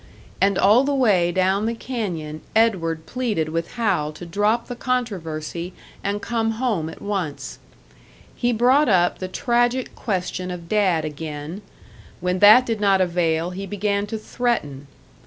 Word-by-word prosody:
And 195 -1 +3
all 215 +7 +5
the 280 0 0
way 195 -10 +3
down 190 +4 +1
the 230 - -1
canyon 175 -12 -4
Edward 170 -8 +1
pleaded 215 -9 -2
with 165 +1 -3
Hal 195 -11 0
to 175 - -9
drop 210 +7 +1
the 245 - -5
controversy 180 -9 -3 0.3
and 200 +1 -2
come 225 -1 0
home 220 -9 -1
at - - -11
once. 190 -8 -4 0.8
He 245 -1 0
brought 250 +5 +4
up 175 -3 +3
the 185 - -4
tragic 240 +5 0
question 185 -3 -3
of 175 -2 -7
Dad 185 -6 +2
again; 150 +4 -6 0.6
when 180 0 -1
that 215 +6 +8
did 225 -3 -2
not 195 -2 +4
avail, 170 -2 +1
he 195 +2 -6
began 205 0 -1
to 220 - -4
threaten. 180 - -2
195 Hz, 150 wpm, -22 LUFS, 170-230 Hz, 0.8 s, that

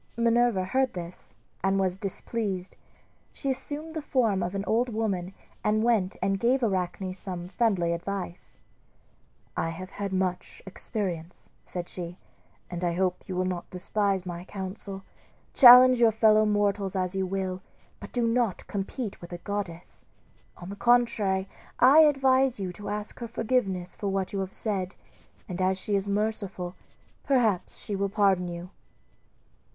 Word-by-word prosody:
Minerva 235 -4 +3
heard 260 +6 +1
this 175 0 -8 0.3
and 195 0 +2
was 185 -2 +1
displeased. 195 -1 -3 0.6
She 275 - -2
assumed 295 +4 -5
the 315 -1 -4
form 230 -9 +1
of 175 +2 -2
an 195 - -1
old 240 +3 +1
woman 195 -5 -2 0.3
and 215 +1 +2
went 220 -6 +2
and 195 0 +1
gave 250 +4 +2
Arachne 185 -2 -1
some 180 -2 -6
friendly 185 -5 +1
advice 180 0 -5 1.0
"I 165 - -1
have 185 +3 -7
had 200 -1 -4
much 185 -1 -2
experience," 185 -4 -5 0.2
said 175 -1 -5
she, 175 0 -7 0.5
"and 175 0 -5
I 175 -1 +1
hope 180 +1 -1
you 185 - -3
will 185 0 0
not 180 -1 -3
despise 195 +1 -1
my 175 -1 -5
counsel. 195 0 -7 0.5
Challenge 255 -1 +9
your 235 -1 +6
fellow 215 -1 +4
mortals 205 -2 +1
as 185 -1 -1
you 190 -1 -1
will, 185 -1 -3 0.4
but - - -10
do 240 -2 0
not 230 -4 0
compete 205 +2 -4
with 175 - -10
a 175 - -4
goddess. 185 -3 -6 0.5
On 175 - -9
the 200 - -6
contrary, 215 -5 +2 0.3
I 270 +5 +7
advise 270 -5 +4
you 185 -2 -3
to 205 +3 -7
ask 210 +1 -5
her 235 - -4
forgiveness 200 -7 -1
for 205 - -4
what 195 -1 -1
you 200 - -1
have 190 0 -4
said, 190 -4 -2 0.5
and 185 0 -4
as 185 0 +2
she 205 +2 -2
is 195 0 0
merciful 200 -3 -2 0.5
perhaps 235 -9 +1
she 205 - -4
will 200 0 0
pardon 195 -3 +2
you." 175 +1 -7
195 Hz, 155 wpm, -27 LUFS, 185-225 Hz, 1.0 s, Challenge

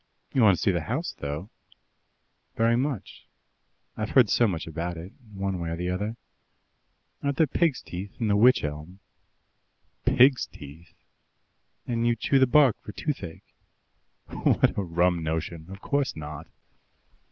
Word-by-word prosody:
"You 130 - +3
want 100 -5 +6
to - - -7
see 100 - +4
the 85 -3 -1
house, 130 - -3
though?" 75 +8 -5 1.0
"Very 115 +1 +3
much 130 -3 -3 0.7
I've 110 -1 -3
heard 125 -6 +5
so 120 - +4
much 85 -5 -3
about 85 +2 -4
it, 85 +4 -8 0.2
one 95 -2 -3
way 85 -1 -3
or 85 - -2
the 90 +1 -2
other. 105 +5 -3 1.1
Aren't 140 -1 -1
there 160 - +5
pigs' 155 -1 0
teeth 95 +3 -8
in 115 - 0
the 105 - +3
wych 125 +5 +5
elm?" 75 +5 -6 1.1
"PIGS' 130 +1 +5
TEETH?" 75 +4 -13 0.9
"And 120 -1 0
you 120 - +3
chew 135 +4 +2
the 130 - +5
bark 135 -3 +4
for 105 - -9
toothache." 100 - -5 0.8
"What - - +1
a - - 0
rum 85 -1 +1
notion! 80 +1 -3
Of 95 0 -10
course 140 -1 0
not!" 75 -1 -7
100 Hz, 150 wpm, -26 LUFS, 85-125 Hz, 1.1 s, want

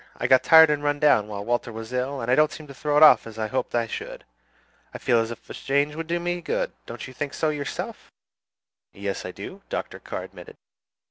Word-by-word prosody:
"I - - -3
got 130 - +5
tired 160 -1 +8
and 145 -1 -1
run 145 0 +1
down 145 -9 +4
while 100 -1 -6
Walter 120 0 -1
was 115 +2 -8
ill, 130 +2 -2
and 115 +2 -1
I - - +5
don't 150 +2 +4
seem 155 - -9
to 140 - -11
throw 145 +2 -1
it 150 - +7
off 155 - +7
as 110 -1 -10
I 110 - -1
hoped 125 +2 -2
I 120 -1 +2
should. 115 - -7 0.7
I - - -2
feel 120 - +2
as 115 0 -1
if 115 - -9
a - - -8
change 140 +2 0
would 165 0 -5
do 170 +1 -1
me 175 0 -2
good. - - -2 0.2
Don't - - -7
you 130 - -11
think 140 +2 -4
so 160 - +1
yourself?" 145 -2 -5 0.8
"Yes, 100 -1 -4
I - - -6
do," 185 - -9
Dr. - - -4
Carr - - -6
admitted. - - -12
140 Hz, 240 wpm, -25 LUFS, 115-155 Hz, 0.8 s, tired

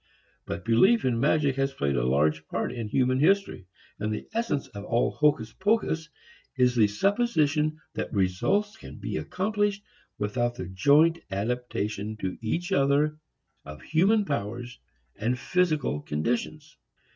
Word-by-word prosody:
But - - -5
belief 190 - +4
in 120 -3 +1
magic 140 0 +2
has 135 0 0
played 70 -1 0
a - - +1
large 75 +5 +1
part - - -2
in 115 -3 -5
human 130 +3 +1
history. 175 - +1 0.3
And 110 +1 -2
the 105 - -5
essence 230 - -1
of 100 -1 -8
all 115 +3 +1
hocus 140 -7 +1
pocus 190 -6 0 0.5
is 125 -1 +3
the 110 -3 +5
supposition 155 - +1
that - - -4
results 110 - 0
can - - -11
be - - -4
accomplished 205 +1 -1 0.3
without 120 +3 -1
the 95 - -5
joint 145 - +4
adaptation 110 -1 -3
to 95 -3 -3
each 170 - -2
other 150 -1 +2 0.4
of 75 +1 -10
human 200 +7 +3
powers 120 - -4 0.4
and 120 +4 -1
physical 155 - 0
conditions. 125 - -3
130 Hz, 140 wpm, -27 LUFS, 105-160 Hz, 0.5 s, the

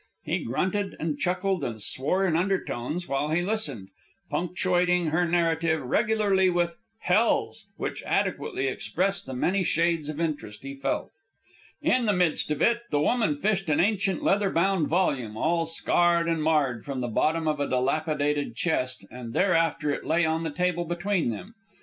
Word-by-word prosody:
He - - -1
grunted 190 - -1
and 155 -2 -2
chuckled 185 +1 0
and 115 -2 -3
swore 150 - 0
in 170 -4 +1
undertones 175 -3 -1
while 140 +2 -1
he 165 +3 +1
listened, 150 - -3 0.4
punctuating 180 -1 +1
her 175 +2 +2
narrative 165 -1 +1
regularly 195 - +2
with 175 -1 0 0.3
hells! 180 - +1
which - - -4
adequately 135 - -1
expressed 190 +8 -1
the 130 - -5
many 185 +9 +1
shades 165 -2 +1
of 155 0 -5
interest 150 -11 -3
he 135 0 -6
felt. 135 0 -2 0.7
In 255 -7 +2
the 210 - +3
midst 180 -5 +1
of 150 0 0
it, 235 0 +3
the 145 - +1
woman 160 -1 +1
fished 195 0 0
an 150 - +2
ancient 200 0 +1
leather 200 0 +2
bound 175 -2 +1
volume, 135 - 0
all 165 +4 +1
scarred 170 +1 +2
and 165 -1 0
marred, 145 -7 +1
from 135 -2 -4
the 120 - -2
bottom 160 +8 +1
of 150 -1 0
a 145 - -1
dilapidated 145 +1 0
chest, 130 -4 -1
and 120 -2 -8
thereafter 165 -5 +2
it - - -3
lay 165 +1 +2
on 160 +1 0
the 165 - -2
table 175 +2 0
between 175 -1 0
them. 180 - -6
165 Hz, 165 wpm, -26 LUFS, 145-185 Hz, 0.7 s, the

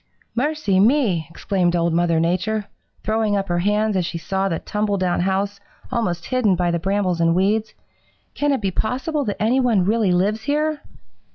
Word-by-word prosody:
"'Mercy 270 -7 +1
me!' 210 - +2
exclaimed 175 0 0
Old 170 -1 +1
Mother 170 -1 +2
Nature, 185 +6 0 0.4
throwing 215 -1 +1
up 195 -1 -3
her 175 0 +1
hands 210 +3 +1
as 185 - +1
she 170 - -4
saw 190 +4 -1
the 165 - -1
tumble 210 +2 -2
down 185 -2 0
house 195 +2 -1 0.3
almost 175 -7 -1
hidden 250 -7 +2
by 175 -1 0
the 170 - 0
brambles 190 -1 0
and 165 0 +3
weeds. 210 +4 +1 0.6
'Can 290 0 0
it 270 - 0
be 195 -2 -1
possible 265 - -1
that 205 - -3
any 230 +5 +2
one 230 -8 +2
really 215 -1 +2
lives 200 +5 +1
here?' 300 +3 -1
200 Hz, 180 wpm, -21 LUFS, 175-220 Hz, 0.6 s, and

